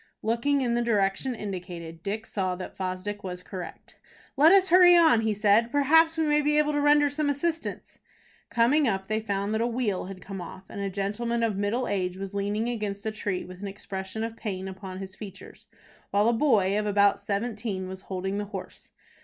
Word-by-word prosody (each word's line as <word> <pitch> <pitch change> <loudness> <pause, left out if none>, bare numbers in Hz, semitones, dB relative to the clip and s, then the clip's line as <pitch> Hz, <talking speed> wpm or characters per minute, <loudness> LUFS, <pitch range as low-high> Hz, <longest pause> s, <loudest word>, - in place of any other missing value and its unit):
Looking 235 +6 +1
in 240 -2 0
the 240 - +1
direction 225 +2 0
indicated, 180 -5 -7
Dick 210 +4 -4
saw 185 -4 -2
that 185 0 -8
Fosdick 190 +2 -4
was 180 -1 -6
correct. 185 -3 -9 0.4
"Let 300 +4 +6
us 385 -1 +5
hurry 355 0 +8
on," 320 -9 +5
he 220 -1 0
said. 215 +3 +3
"Perhaps 320 +4 +4
we 320 - +2
may 300 0 +3
be 300 +1 +2
able 300 0 +3
to 290 - +1
render 290 0 +5
some 290 +1 -1
assistance." 320 +4 -3 0.5
Coming 240 +6 +3
up, 195 -2 -2
they 215 0 +1
found 200 -1 -2
that 220 - 0
a 235 - +2
wheel 230 -7 -1
had 190 0 -8
come 195 0 -7
off, 185 +2 -9
and 200 - -6
a 200 - -1
gentleman 210 +5 -2
of 220 -3 +1
middle 205 +6 -1
age 185 -2 -1
was 195 0 -6
leaning 205 +3 -1
against 210 -4 -3
a 220 - 0
tree 205 -3 -3
with 185 +1 -11
an 205 - -4
expression 195 +1 -5
of 225 0 -4
pain 190 -4 -5
upon 190 0 -7
his 190 0 -8
features, 200 -3 -11 0.4
while 205 +2 +2
a 235 - +4
boy 210 -6 +3
of 210 - -2
about 200 -1 +3
seventeen 205 -2 -3
was 190 0 -8
holding 190 +1 -2
the 205 - -3
horse. 195 -2 -9
210 Hz, 205 wpm, -27 LUFS, 195-240 Hz, 0.5 s, hurry